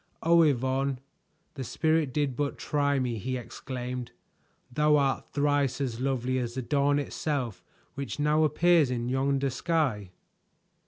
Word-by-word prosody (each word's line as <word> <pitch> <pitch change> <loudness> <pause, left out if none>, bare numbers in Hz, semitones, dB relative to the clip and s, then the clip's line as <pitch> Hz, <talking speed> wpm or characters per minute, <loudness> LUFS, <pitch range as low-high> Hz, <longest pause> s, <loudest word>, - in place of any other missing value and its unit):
"Oh, 170 +1 +5
Yvonne! 135 -2 +1 0.5
The 135 - -5
Spirit 155 +2 +1
did 145 -2 -1
but 145 +2 -2
try 145 -1 0
me," 125 -4 -1
he 130 +5 -3
exclaimed. 125 0 -6 0.6
"Thou 150 +3 +3
art 140 -2 0
thrice 145 -2 +1
as 125 -4 -2
lovely 130 -1 0
as 120 -1 -4
the 130 - -3
dawn 145 +2 +2
itself 140 - -3 0.3
which 140 0 -5
now 150 +1 +3
appears 160 -1 +4
in 120 -1 -2
yonder 135 +1 +1
sky!" 130 - -1
135 Hz, 140 wpm, -28 LUFS, 125-145 Hz, 0.6 s, Oh